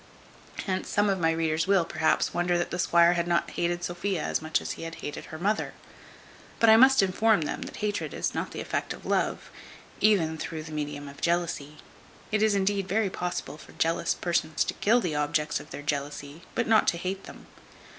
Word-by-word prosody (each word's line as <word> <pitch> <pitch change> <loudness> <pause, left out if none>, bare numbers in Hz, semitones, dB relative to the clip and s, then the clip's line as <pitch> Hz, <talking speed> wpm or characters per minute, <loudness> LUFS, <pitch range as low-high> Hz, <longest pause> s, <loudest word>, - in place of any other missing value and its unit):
Hence 185 -1 -2
some 205 0 +2
of 190 - -1
my 165 -1 +3
readers 160 0 0
will, 195 -4 +4
perhaps, 160 - +1
wonder 175 0 +1
that 175 - -2
the 175 - -3
squire 170 0 +5
had 170 -1 -1
not 175 -1 +1
hated 175 0 -1
Sophia 175 0 -2
as - - -1
much 155 0 0
as - - -5
he - - -7
had 165 0 -6
hated 145 - -6
her 160 - -8
mother; 205 +6 -1 0.8
but 225 -1 +6
I - - +9
must 260 0 +7
inform 205 +1 +3
them, 150 - -3
that - - -7
hatred 210 -1 -2
is - - -2
not - - -2
the - - -6
effect - - -2
of - - -13
love, - - -1 0.5
even 165 -7 +3
through 160 -1 -5
the 155 - -10
medium 145 -1 -4
of 140 0 -11
jealousy. 170 -4 -1 0.5
It 215 0 +1
is, 215 -1 +3
indeed, 195 0 0
very 200 -1 +1
possible 180 -4 -4
for - - -14
jealous 165 +1 0
persons 160 -3 0
to - - -3
kill 235 +4 +3
the 170 -7 -2
objects 150 +1 0
of 150 - -12
their 145 - -7
jealousy, 145 +1 -4
but 235 - +1
not 220 -1 +4
to 170 - +2
hate 190 +3 -4
them. - - -12
175 Hz, 205 wpm, -27 LUFS, 155-195 Hz, 0.8 s, I